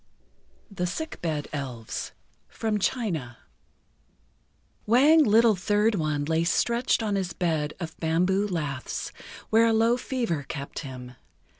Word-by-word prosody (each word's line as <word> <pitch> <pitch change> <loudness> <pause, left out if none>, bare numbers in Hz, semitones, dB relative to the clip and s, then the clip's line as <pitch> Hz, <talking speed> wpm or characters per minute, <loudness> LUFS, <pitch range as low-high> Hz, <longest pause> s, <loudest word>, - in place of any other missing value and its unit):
THE 180 -3 -2
SICK 315 - -5
BED 155 -4 -2
ELVES 125 -6 -5 0.4
From 215 -2 -2
China 170 - -2 1.5
Wang 290 +8 +6
Little 225 -2 +5
Third 210 +4 +2
One 155 -5 -1
lay 160 +2 +1
stretched 235 +7 +1
on 210 -2 -1
his 190 -3 -1
bed 160 -4 -1
of 165 -3 -6
bamboo 180 +5 +1
laths, 150 -8 -4 0.4
where 225 +1 +5
a 225 - +3
low 230 +2 +3
fever 235 - -2
kept 140 +1 -6
him. 130 -3 -8
180 Hz, 125 wpm, -26 LUFS, 150-225 Hz, 1.5 s, Wang